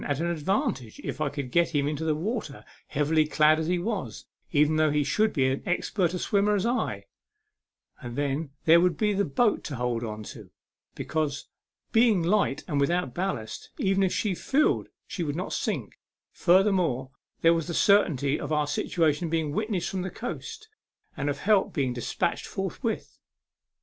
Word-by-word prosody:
77 145 Hz, -, -1 dB
at 165 Hz, +5 st, -2 dB
an 170 Hz, -, 0 dB
advantage 165 Hz, -, -2 dB
if -, -, -5 dB
I 150 Hz, -, +1 dB
could 140 Hz, -3 st, -5 dB
get 170 Hz, 0 st, +2 dB
him 140 Hz, -1 st, +2 dB
into 150 Hz, +1 st, -2 dB
the 155 Hz, -1 st, +1 dB
water, 170 Hz, -, -4 dB, 0.2 s
heavily 150 Hz, +1 st, +1 dB
clad 155 Hz, 0 st, +4 dB
as 160 Hz, -, -2 dB
he 180 Hz, +1 st, +1 dB
was, 200 Hz, +3 st, -4 dB, 0.3 s
even 150 Hz, 0 st, +3 dB
though 155 Hz, 0 st, +4 dB
he 150 Hz, 0 st, +1 dB
should 215 Hz, +9 st, +2 dB
be 135 Hz, -4 st, +1 dB
as 130 Hz, +1 st, 0 dB
expert 180 Hz, 0 st, 0 dB
a -, -, -1 dB
swimmer 205 Hz, +3 st, +2 dB
as 195 Hz, -, 0 dB
I; 240 Hz, +2 st, -1 dB, 1.0 s
and 120 Hz, -3 st, -7 dB
then 145 Hz, +2 st, -1 dB, 0.2 s
there 165 Hz, +1 st, +7 dB
would 180 Hz, -3 st, +2 dB
be 210 Hz, +2 st, +1 dB
the 200 Hz, +1 st, +1 dB
boat 205 Hz, -, +1 dB
to 145 Hz, -, -4 dB
hold 120 Hz, -1 st, -1 dB, 0.2 s
to, -, -, -10 dB, 0.5 s
be -, -, -5 dB
cause, 150 Hz, -3 st, -2 dB, 0.4 s
being 225 Hz, -6 st, +4 dB
light 175 Hz, -6 st, +1 dB
and 145 Hz, -5 st, 0 dB
without 170 Hz, -2 st, 0 dB
ballast, 175 Hz, -, -4 dB
even 195 Hz, 0 st, +1 dB
if 190 Hz, -2 st, +2 dB
she 205 Hz, -3 st, 0 dB
filled 275 Hz, -, +1 dB, 0.2 s
she 180 Hz, -, -6 dB
would 150 Hz, -3 st, -2 dB
not 180 Hz, +3 st, -4 dB
sink; -, -, -3 dB, 0.3 s
furthermore, 175 Hz, -, +2 dB, 0.3 s
there 165 Hz, 0 st, +6 dB
was 165 Hz, -2 st, -1 dB
the 170 Hz, -, -3 dB
certainty 150 Hz, -9 st, +3 dB
of -, -, -5 dB
our 150 Hz, -1 st, +2 dB
situation 155 Hz, +2 st, 0 dB
being 160 Hz, -2 st, 0 dB
witnessed 210 Hz, 0 st, -2 dB
from 190 Hz, -, -2 dB
the 185 Hz, -, -3 dB
coast, 435 Hz, -, -7 dB, 0.5 s
and 140 Hz, +1 st, -2 dB
of 145 Hz, -, -2 dB
help 205 Hz, -1 st, +3 dB
being 135 Hz, -6 st, 0 dB
despatched 120 Hz, -1 st, -2 dB
forthwith. -, -, -4 dB
165 Hz, 180 wpm, -27 LUFS, 145-195 Hz, 1.0 s, there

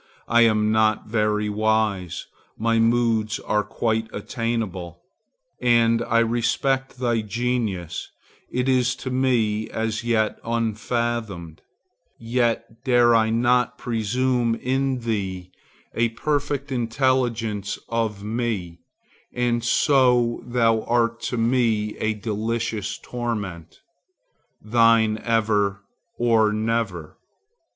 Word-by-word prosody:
I 120 Hz, 0 st, +4 dB
am 110 Hz, -2 st, +3 dB
not 110 Hz, -1 st, +2 dB
very 105 Hz, -1 st, 0 dB
wise; 105 Hz, -4 st, 0 dB, 0.3 s
my 115 Hz, +1 st, +1 dB
moods 115 Hz, -2 st, +2 dB
are 105 Hz, 0 st, 0 dB
quite 110 Hz, 0 st, -1 dB
attainable, 105 Hz, -6 st, -4 dB, 0.6 s
and 115 Hz, -1 st, +3 dB
I 115 Hz, -1 st, +1 dB
respect 130 Hz, +4 st, 0 dB
thy 120 Hz, -3 st, 0 dB
genius; 105 Hz, -6 st, -2 dB, 0.4 s
it 125 Hz, +1 st, -1 dB
is 130 Hz, -1 st, +2 dB
to 130 Hz, 0 st, -6 dB
me 115 Hz, -5 st, +1 dB
as 110 Hz, 0 st, -2 dB
yet 115 Hz, -2 st, 0 dB
unfathomed; 115 Hz, -6 st, -2 dB, 0.6 s
yet 115 Hz, -1 st, -1 dB
dare 120 Hz, -2 st, +4 dB
I 110 Hz, -1 st, +3 dB
not 120 Hz, +1 st, +2 dB
presume 120 Hz, +1 st, 0 dB
in 130 Hz, +1 st, -1 dB
thee 95 Hz, -5 st, -3 dB, 0.4 s
a 115 Hz, 0 st, +1 dB
perfect 145 Hz, +2 st, -2 dB
intelligence 115 Hz, -4 st, 0 dB
of 110 Hz, -3 st, -2 dB
me, 105 Hz, -6 st, -3 dB, 0.6 s
and 120 Hz, -1 st, 0 dB
so 125 Hz, -2 st, +3 dB
thou 115 Hz, -2 st, +2 dB
art 115 Hz, -1 st, +1 dB
to 125 Hz, -, -3 dB
me 115 Hz, -3 st, +1 dB
a 110 Hz, 0 st, -1 dB
delicious 110 Hz, 0 st, -3 dB
torment. 105 Hz, -9 st, -5 dB, 0.8 s
Thine 115 Hz, -1 st, +3 dB
ever, 105 Hz, -3 st, +1 dB, 0.3 s
or 115 Hz, -3 st, +3 dB
never. 110 Hz, -7 st, -2 dB
115 Hz, 100 wpm, -23 LUFS, 110-120 Hz, 0.8 s, I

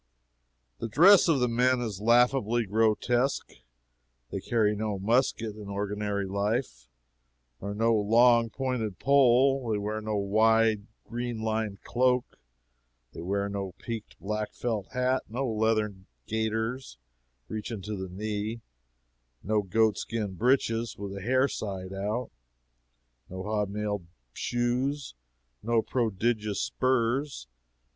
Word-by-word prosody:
The -, -, -3 dB
dress 180 Hz, -, +7 dB
of 160 Hz, -5 st, +3 dB
the 125 Hz, -, +2 dB
men 125 Hz, +2 st, +2 dB
is 110 Hz, -5 st, -4 dB
laughably 120 Hz, 0 st, +3 dB
grotesque. 115 Hz, +5 st, +1 dB, 0.8 s
They -, -, -2 dB
carry 105 Hz, -3 st, +1 dB
no 105 Hz, -1 st, -2 dB
musket 115 Hz, +1 st, +1 dB
in 105 Hz, -1 st, -9 dB
ordinary 100 Hz, 0 st, -2 dB
life, 100 Hz, -, -2 dB, 0.7 s
nor 100 Hz, +1 st, -4 dB
no 115 Hz, +2 st, +3 dB
long 115 Hz, +2 st, +4 dB
pointed 120 Hz, -5 st, -3 dB
pole; 135 Hz, -1 st, +4 dB
they 105 Hz, -, +1 dB
wear 105 Hz, +1 st, -3 dB
no 110 Hz, 0 st, -2 dB
wide 110 Hz, +1 st, +3 dB, 0.2 s
green 120 Hz, 0 st, -3 dB
lined 110 Hz, -2 st, -2 dB
cloak; 125 Hz, -, +1 dB, 0.7 s
they -, -, -7 dB
wear 100 Hz, +3 st, -1 dB
no 100 Hz, -2 st, -4 dB
peaked 115 Hz, -3 st, -7 dB
black 105 Hz, +1 st, -3 dB
felt 110 Hz, -5 st, -2 dB
hat, 130 Hz, 0 st, +1 dB
no 130 Hz, +4 st, -2 dB
leathern 110 Hz, -3 st, 0 dB, 0.2 s
gaiters 110 Hz, +3 st, -2 dB, 0.5 s
reaching 110 Hz, -1 st, -5 dB
to 105 Hz, +2 st, -4 dB
the 95 Hz, -1 st, -5 dB
knee, 105 Hz, +4 st, -4 dB, 0.8 s
no 105 Hz, +1 st, +1 dB
goat 110 Hz, +2 st, +2 dB
skin 105 Hz, -4 st, -3 dB
breeches 115 Hz, 0 st, +1 dB
with 100 Hz, -1 st, -6 dB
the 100 Hz, -, -6 dB
hair 130 Hz, +6 st, +3 dB
side 95 Hz, -6 st, -5 dB
out, 105 Hz, +5 st, -3 dB, 1.0 s
no 95 Hz, +1 st, -6 dB
hob 105 Hz, -1 st, -1 dB
nailed 105 Hz, -3 st, -3 dB, 0.3 s
shoes, 125 Hz, -, -1 dB, 0.5 s
no 115 Hz, 0 st, +1 dB
prodigious 110 Hz, -2 st, -1 dB
spurs. 130 Hz, -, 0 dB
110 Hz, 120 wpm, -28 LUFS, 105-120 Hz, 1.0 s, dress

